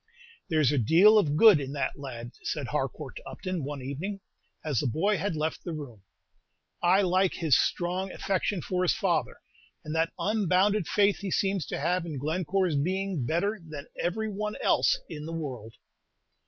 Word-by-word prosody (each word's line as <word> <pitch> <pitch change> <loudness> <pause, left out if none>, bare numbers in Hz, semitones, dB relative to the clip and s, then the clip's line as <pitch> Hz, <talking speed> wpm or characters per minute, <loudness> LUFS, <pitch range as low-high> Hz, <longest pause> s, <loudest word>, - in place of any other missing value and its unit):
"There's 155 -5 +3
a 145 - +2
deal 185 - +6
of 150 -7 +1
good 215 -6 +8
in 135 0 -5
that 145 0 -2
lad," 120 -4 -7
said - - -3
Harcourt - - -3
to - - -10
Upton, 185 -5 -4
one 140 -1 -5
evening, 165 +10 -4 0.5
as 145 -7 0
the 145 - 0
boy 195 - +1
had 180 0 -2
left 155 +1 -2
the 170 - -4
room; 125 -9 -8 0.8
"I 185 +3 +4
like 185 0 +2
his 160 -7 +3
strong 180 +6 0
affection 195 -1 -1
for 180 -1 -1
his 180 - +2
father, - - 0 0.5
and 155 - -4
that 165 0 +1
unbounded 200 -2 +2
faith 205 -1 +3
he 200 - -4
seems 195 -4 0
to - - -3
have 180 0 0
in 155 -4 -5
Glencore's 170 +4 0
being 185 -3 -1
better 200 +6 0
than 155 -3 -8
every 220 +6 -2
one 210 0 -3
else - - +3
in 150 +1 -7
the 165 - -5
world." 125 -9 -6
175 Hz, 175 wpm, -28 LUFS, 150-195 Hz, 0.8 s, good